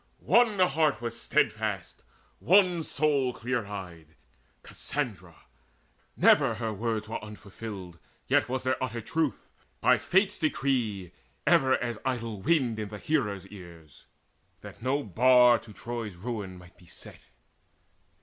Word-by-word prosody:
One 235 -4 +4
heart 155 - +2
was 115 0 -5
steadfast, - - -1 0.4
and - - -15
one 180 -3 +5
soul 140 -4 0
clear 120 -3 -3
eyed, 85 -6 -9 0.5
Cassandra. 105 - -5 0.8
Never 115 - +5
her 110 0 -3
words 110 0 -2
were 110 - -5
unfulfilled; 100 -4 -9 0.3
Yet - - +2
was 130 0 -2
their 130 0 0
utter 120 -2 -3
truth, 155 +5 -2 0.3
by - - +4
Fate's 190 +2 +1
decree, 120 - -1 0.3
Ever 130 0 +4
as 120 -2 -4
idle 115 -5 -3
wind 130 - +1
in 105 -1 -4
the 105 - -7
hearers' 105 - -1
ears, 85 -6 -13 0.5
That - - -12
no 135 +4 0
bar 125 +3 +5
to 110 0 -14
Troy's 115 -2 -6
ruin 100 -2 -5
might 90 0 -16
be 90 - -19
set. - - -10
115 Hz, 130 wpm, -28 LUFS, 100-135 Hz, 0.8 s, one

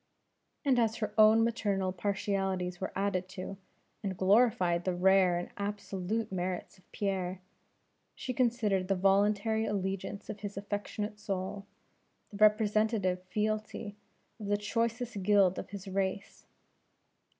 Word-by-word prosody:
And 260 -3 +4
as 225 -1 +2
her 215 -3 -3
own 220 +1 +7
maternal 200 -5 0
partialities 190 -1 -1
were 190 - -2
added 190 -2 -1
to, 190 +1 -5 0.4
and 195 -4 -3
glorified 190 -4 +3
the 185 -1 -1
rare 185 -1 +4
and 175 - -5
absolute 205 +1 -3
merits 185 0 -3
of - - -29
Pierre; 190 -2 -2 0.8
she 255 - -4
considered 225 -7 +1
the 195 - +2
voluntary 205 +3 +2
allegiance 195 0 -3
of 215 - -6
his 205 -1 -6
affectionate 205 +1 -4
soul, 195 0 -4 0.6
the 205 - -8
representative 215 -3 +3
fealty 215 +1 -2 0.4
of 210 - -6
the 205 0 +2
choicest 230 +1 -2
guild 195 -1 +4
of - - -7
his 200 0 -8
race. 195 +1 -3
200 Hz, 130 wpm, -31 LUFS, 190-215 Hz, 0.8 s, own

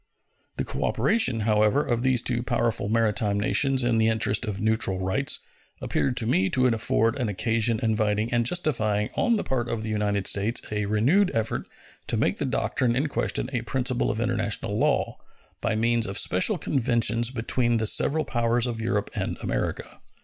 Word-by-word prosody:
The - - -1
cooperation, 205 - +1
however, 105 +6 +2
of 120 -1 -1
these 130 -1 +1
two 120 -1 0
powerful 120 -4 -1
maritime 110 -2 +1
nations 135 +5 +2
in 120 -2 +1
the 110 - +3
interest 110 0 +1
of 105 -3 -4
neutral 110 -3 +1
rights 95 +9 +1 0.4
appeared 125 -2 -1
to 115 - +1
me 95 -5 +1
to 130 -1 +1
afford 115 -1 +1
an 120 -5 -1
occasion 115 +2 0
inviting 110 0 0
and 120 0 +2
justifying 115 - 0
on 235 - +2
the 210 - -2
part 120 -3 -2
of 110 -1 -3
the 110 - -4
United 105 -2 -1
States 105 +4 +1
a 105 -1 -1
renewed 135 - +2
effort 115 0 -2 0.4
to - - 0
make - - 0
the - - -1
doctrine 120 -2 0
in 140 +4 0
question 125 - -1
a 120 - -1
principle 125 +1 -1
of 110 - -2
international 110 -3 -1
law, - - 0 0.4
by 110 -1 -1
means 115 +1 +1
of 100 - -3
special 95 - +2
conventions 120 -5 +1
between 120 -1 0
the 110 - -1
several 155 +7 +2
powers 120 0 0
of 115 -2 -4
Europe 105 -3 -2
and - - -3
America. - - -3
115 Hz, 175 wpm, -25 LUFS, 110-125 Hz, 0.4 s, the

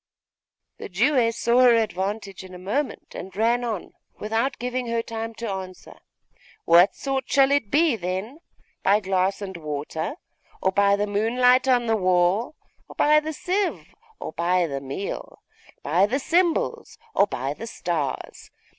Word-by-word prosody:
The - - -7
Jewess 230 +3 +2
saw 235 +1 +2
her 250 -2 +7
advantage 200 -2 -2
in 185 -1 -11
a - - -8
moment, 215 +11 -3
and 185 0 -8
ran 235 +3 +2
on, 220 -6 -4 0.2
without 225 +5 -1
giving 250 +1 -3
her 230 0 -1
time 225 0 -5
to 230 +1 -5
answer 190 -2 -7 0.7
'What 170 +3 +6
sort 270 -2 -3
shall 275 0 +4
it 280 -7 +1
be, 305 0 +3
then? 190 - -4 0.4
By 200 +2 +4
glass 190 0 0
and 190 -1 -6
water, 155 - -4 0.4
or 190 - +1
by 200 +1 +4
the 205 +1 0
moonlight 250 +5 +3
on 245 -2 +3
the 225 -1 +2
wall, 185 - +2 0.3
or - - -12
by 300 +1 +5
the 310 +1 -4
sieve, 370 +6 -2 0.3
or - - -5
by 175 +2 +1
the 140 -4 -4
meal? 140 +9 -6 0.4
By 175 +7 +3
the 250 +6 0
cymbals, 335 +4 0 0.2
or 200 - +4
by 135 -4 -3
the 225 +9 -8
stars? 165 -10 -4
215 Hz, 155 wpm, -24 LUFS, 185-250 Hz, 0.7 s, her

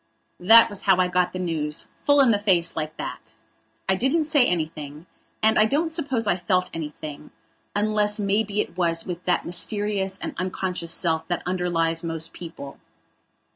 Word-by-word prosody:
That 225 +6 +7
was 205 -3 -3
how 190 -2 +4
I 185 -1 +3
got 180 0 +1
the - - -6
newsfull 170 - 0
in 250 - +4
the 205 - +2
face, 185 -5 +1
like 155 0 -4
that. - - -7 0.5
I 190 - +3
didn't 265 - +1
say 300 -3 +3
anything 155 -2 -4 0.4
and 220 0 +4
I 215 - +6
don't 305 +8 0
suppose 275 -8 -1
I 185 - +1
felt 185 0 0
anything, 150 -1 -7 0.5
unless 210 0 +1
maybe 205 +1 0
it 170 - -7
was 170 -2 +1
with 180 -1 -6
that 180 - +1
mysterious 195 +1 0
and - - -6
unconscious 180 -2 -3
self 160 -1 0
that 175 -1 -2
underlies 175 -2 0
most 165 -1 -3
people. 150 -5 -9
180 Hz, 165 wpm, -24 LUFS, 165-210 Hz, 0.5 s, That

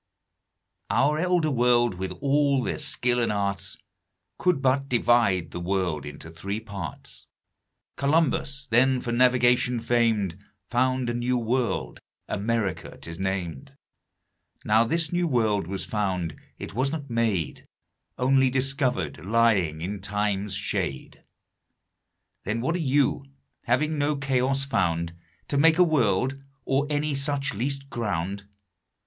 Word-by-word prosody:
Our 150 +3 +2
Elder 175 -3 +2
World, 120 -3 +3
with 95 0 -3
all 140 -1 +2
their - - -2
Skill 125 -5 0
and 115 - +1
Arts, 100 -1 -2 0.6
Could 180 -5 +2
but 135 +1 +1
divide 115 -9 +2
the - - -5
World 85 -5 -1
into 75 +3 -9
three 100 +5 -4
Parts: 100 -8 -8 0.7
Columbus, 140 -1 +1
then 130 +3 +4
for 120 - -4
Navigation 125 0 +3
fam'd, 115 -6 +1 0.3
Found 130 +1 +1
a 120 - -1
new 120 +1 0
World, 115 - -1 0.3
America 105 -2 -2
'tis 85 0 -8
nam'd; 95 -7 -3 0.9
Now 110 +2 +4
this 165 +6 0
new 175 0 +1
World 110 - +1
was 95 +1 -3
found, 95 -7 -2 0.2
it - - -7
was 130 +5 0
not 150 -3 -4
made, 110 -9 -1 0.5
Onely 135 +1 +3
discovered, 130 - -1
lying 100 -7 +2
in 100 +4 -4
Time's 105 0 -1
shade. 65 - -3 1.2
Then 110 +3 -2
what 130 +8 0
are - - -1 0.2
You, 140 - +2 0.4
having 150 +6 +1
no 145 +1 +1
Chaos 135 0 0
found 85 -9 0 0.4
To 140 - +1
make 160 +2 +5
a 180 - +7
World, 135 - +1 0.2
or 135 +2 +1
any 150 0 0
such 140 -1 0
least 135 +5 -3
ground? 100 -3 -3
120 Hz, 130 wpm, -26 LUFS, 100-135 Hz, 1.2 s, a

